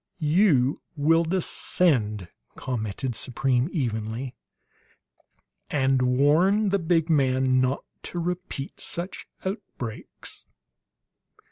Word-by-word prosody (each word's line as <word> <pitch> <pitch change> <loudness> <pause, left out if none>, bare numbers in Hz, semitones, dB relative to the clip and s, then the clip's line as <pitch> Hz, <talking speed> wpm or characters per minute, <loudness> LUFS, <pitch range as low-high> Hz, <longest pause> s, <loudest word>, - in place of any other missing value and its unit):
"You 150 -5 +3 0.2
will 160 +3 +4
descend," 145 - +1 0.3
commented 120 +1 -3
Supreme 130 +2 0
evenly, 120 - -2 1.4
"and 135 -2 +2
warn 155 +12 +4
the 200 +1 +2
big 165 -1 +2
man 130 -4 +3
not 130 +2 0 0.2
to - - -6
repeat 175 -5 -4
such 175 +3 -5 0.2
outbreaks." 190 - -6
140 Hz, 85 wpm, -26 LUFS, 125-170 Hz, 1.4 s, will